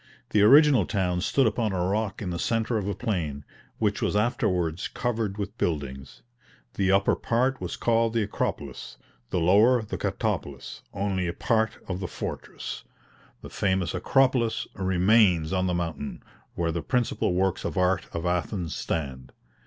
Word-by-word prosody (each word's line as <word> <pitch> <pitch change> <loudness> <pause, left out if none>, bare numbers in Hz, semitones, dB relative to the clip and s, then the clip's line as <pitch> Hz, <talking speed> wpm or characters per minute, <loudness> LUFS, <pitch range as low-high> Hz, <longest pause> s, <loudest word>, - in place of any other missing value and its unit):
The 105 - +4
original 135 - +6
town 90 -4 0
stood 135 +7 +2
upon 110 -2 0
a 90 -1 0
rock 105 +2 -1
in 90 - -3
the 85 - -3
centre 115 0 0
of 100 - -4
a 100 - -2
plain, 80 - -3 0.3
which - - 0
was - - 0
afterwards 90 -6 0
covered 115 -5 -2
with 100 +1 -4
buildings; 65 -6 -3 0.5
the 95 -1 +1
upper 100 0 +3
part 130 +3 0
was - - -4
called 115 -1 +2
the 115 -2 +2
"Acropolis," 105 - -4 0.3
the - - -1
lower 110 +8 +5
the 110 - -5
"Katopolis;" 70 -2 -3
only 95 -2 -1
a 85 - -2
part 110 -1 0
of 90 -1 -3
the 95 - -3
fortress, - - -6 0.6
the - - -8
famous 95 -3 0
Acropolis, 125 +4 +2
remains 95 -3 +3
on 95 0 +1
the 90 - 0
mountain, 80 -4 -4 0.3
where 85 -1 0
the 85 0 -2
principal 110 0 0
works 95 0 0
of - - -3
art 90 +1 +2
of 85 +1 -4
Athens 90 0 -1
stand. 65 -5 -4
95 Hz, 160 wpm, -26 LUFS, 85-110 Hz, 0.6 s, original